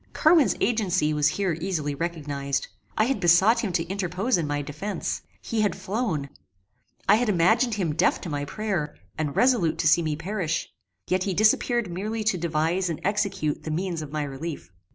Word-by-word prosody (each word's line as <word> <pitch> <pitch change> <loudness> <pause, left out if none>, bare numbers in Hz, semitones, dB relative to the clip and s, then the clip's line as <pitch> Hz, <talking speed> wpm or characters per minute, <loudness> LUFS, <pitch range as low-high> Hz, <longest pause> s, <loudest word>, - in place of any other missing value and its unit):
Carwin's 315 -3 +4
agency 185 -9 +1
was 150 0 +3
here 180 +2 0
easily 160 -6 -1
recognized. 140 -3 -3 0.3
I 215 - +4
had 255 0 0
besought 190 +6 +5
him 205 - -1
to 170 -1 +1
interpose 195 +5 -1
in 165 -4 -1
my 145 0 -1
defence. 155 +9 -4 0.2
He 230 -2 -1
had 210 - +1
flown. 190 - -2 0.8
I 205 - +6
had 240 -1 0
imagined 220 +6 +3
him 175 -7 -1
deaf - - +2
to - - -6
my 145 -1 -2
prayer, 190 -4 -3 0.2
and 150 -3 -3
resolute 200 -12 +3
to 165 - +1
see 160 +3 +5
me 155 -2 -1
perish: 170 0 -3 0.3
yet 185 0 +1
he 195 -2 -1
disappeared 220 0 +2
merely 215 +5 -3
to 215 -3 +1
devise 170 +3 0
and 165 - -3
execute 200 -6 -1
the - - -6
means 170 +1 -2
of 150 -2 -7
my 150 -1 -1
relief. 145 - -6
175 Hz, 180 wpm, -25 LUFS, 155-210 Hz, 0.8 s, I